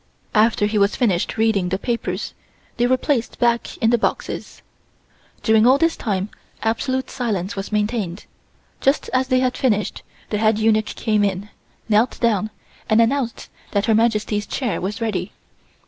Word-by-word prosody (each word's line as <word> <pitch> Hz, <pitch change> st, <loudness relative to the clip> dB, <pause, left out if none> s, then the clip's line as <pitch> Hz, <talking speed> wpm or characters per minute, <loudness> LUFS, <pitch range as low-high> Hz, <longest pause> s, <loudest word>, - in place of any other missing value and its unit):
After 215 Hz, -1 st, +3 dB
he 210 Hz, 0 st, +1 dB
was 200 Hz, +1 st, +3 dB
finished 195 Hz, -7 st, 0 dB
reading 220 Hz, -5 st, +2 dB
the 190 Hz, -, 0 dB
papers, 205 Hz, -4 st, -3 dB, 0.4 s
they 240 Hz, 0 st, +3 dB
were 255 Hz, +1 st, +3 dB
placed 250 Hz, -3 st, -1 dB
back 235 Hz, -1 st, +1 dB
in 225 Hz, -, +2 dB
the 240 Hz, -, +3 dB
boxes. -, -, -3 dB, 0.8 s
During 220 Hz, +1 st, +5 dB
all 260 Hz, +2 st, +6 dB
this 330 Hz, +2 st, +2 dB
time 200 Hz, -3 st, -2 dB, 0.3 s
absolute 260 Hz, +4 st, 0 dB
silence 205 Hz, -7 st, -2 dB
was 195 Hz, +1 st, -5 dB
maintained. 210 Hz, -3 st, -1 dB, 0.5 s
Just 275 Hz, +2 st, +1 dB
as 260 Hz, 0 st, +2 dB
they 255 Hz, -1 st, +2 dB
had 255 Hz, -1 st, +1 dB
finished 210 Hz, -6 st, 0 dB, 0.3 s
the 210 Hz, -, 0 dB
head 215 Hz, 0 st, +3 dB
eunuch 215 Hz, -1 st, +1 dB
came 215 Hz, -2 st, +1 dB
in, 200 Hz, +1 st, -1 dB, 0.4 s
knelt 220 Hz, +2 st, +2 dB
down 215 Hz, -3 st, +1 dB, 0.4 s
and 215 Hz, 0 st, +4 dB
announced 235 Hz, +1 st, 0 dB, 0.2 s
that 200 Hz, 0 st, +1 dB
Her 225 Hz, -, +3 dB
Majesty's 215 Hz, -2 st, +1 dB
chair 250 Hz, -6 st, -2 dB
was 200 Hz, +5 st, -4 dB
ready. 225 Hz, -2 st, -2 dB
220 Hz, 160 wpm, -21 LUFS, 205-240 Hz, 0.8 s, all